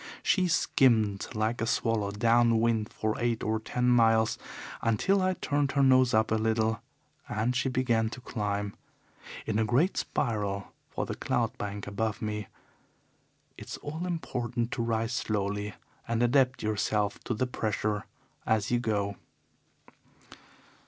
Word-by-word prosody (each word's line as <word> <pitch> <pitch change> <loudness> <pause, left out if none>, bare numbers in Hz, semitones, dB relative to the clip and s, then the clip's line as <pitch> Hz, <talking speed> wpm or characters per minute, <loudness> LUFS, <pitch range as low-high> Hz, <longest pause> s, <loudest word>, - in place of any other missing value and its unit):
She 185 -2 +3
skimmed 110 - +3
like 110 +2 0
a 115 - 0
swallow 115 -3 +1
down 115 +2 +3
wind 110 -2 +1
for 110 0 -1
eight 120 -1 0
or 110 0 0
ten 125 +3 -1
miles 115 -2 +4 0.4
until 190 - +2
I 185 0 +1
turned 145 -4 0
her 140 - +3
nose 130 -1 +5
up 110 0 +2
a 110 - +3
little 110 0 +1 0.5
and 115 +4 0
she 130 +1 +1
began 120 -3 +1
to 120 - -8
climb 105 -4 -2 0.7
in 110 -1 0
a - - +3
great 130 - +2
spiral 105 -5 -2 0.2
for - - -3
the - - -4
cloud - - -1
bank 100 0 -4
above 105 +1 -2
me. 105 -2 -3 1.1
It's - - -7
all 160 +5 -5
important 120 -8 -2
to - - -2
rise 115 0 0
slowly 105 -2 -2 0.3
and 115 +1 +1
adapt 130 +1 +3
yourself 105 -1 0
to 120 - -1
the 130 - 0
pressure 105 -3 -2 0.4
as 110 -1 +1
you 120 - +3
go. 100 -4 -1
115 Hz, 145 wpm, -29 LUFS, 105-125 Hz, 1.1 s, nose